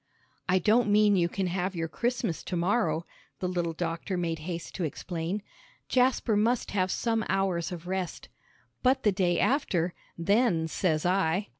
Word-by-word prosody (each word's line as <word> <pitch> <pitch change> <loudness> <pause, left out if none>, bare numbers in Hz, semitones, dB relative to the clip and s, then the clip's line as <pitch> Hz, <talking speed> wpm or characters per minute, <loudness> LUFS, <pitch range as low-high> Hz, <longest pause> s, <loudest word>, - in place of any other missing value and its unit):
"I 185 - +5
don't 215 +4 +3
mean 210 0 +5
you 170 -2 +2
can 195 +2 -2
have 180 +1 -2
your 165 -1 -2
Christmas 235 -1 -2
to 185 - -3
morrow," 175 -3 +1 0.3
the 185 - -1
little 175 -2 -1
doctor 170 +3 -3
made 165 -2 -1
haste 170 -1 -5
to 185 - -2
explain. 170 +5 -3 0.5
"Jasper 250 -3 +2
must 230 +4 +1
have 185 -2 +1
some 225 +2 0
hours 190 -3 0
of 175 -1 -7
rest. 185 -1 -3 0.5
But 260 +1 +3
the 210 - +4
day 180 -3 +1
after 185 - +1 0.2
then 185 -2 +2
says 160 -1 0
I." 185 +1 +1
185 Hz, 160 wpm, -28 LUFS, 170-210 Hz, 0.5 s, I